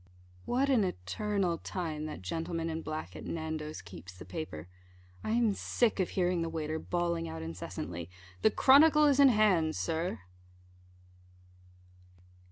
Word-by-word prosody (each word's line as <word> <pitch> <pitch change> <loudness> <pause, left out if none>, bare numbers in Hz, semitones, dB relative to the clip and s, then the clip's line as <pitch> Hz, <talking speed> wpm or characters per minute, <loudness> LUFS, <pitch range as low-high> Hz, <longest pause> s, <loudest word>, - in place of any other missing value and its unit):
What 260 +3 +1
an 240 -6 +4
eternal 180 - -1
time 155 -4 -4
that 150 - -7
gentleman 165 - -3
in 160 0 -3
black, 155 - -5
at 80 - -8
Nando's, 155 -1 -4
keeps 95 0 -11
the - - -10
paper! 120 - -6 0.6
I - - -3
am 230 -2 +3
sick 220 +2 0
of 185 - +1
hearing 180 -2 +1
the 165 - -1
waiter 160 -1 -3
bawling 170 -1 -1
out 80 0 -6
incessantly, 85 0 -6 0.3
"the - - +6
Chronicle 300 +6 +6
is 285 -2 +4
in 280 -1 +8
hand, 195 -9 +3
Sir." 165 - -2
165 Hz, 140 wpm, -31 LUFS, 155-205 Hz, 0.6 s, in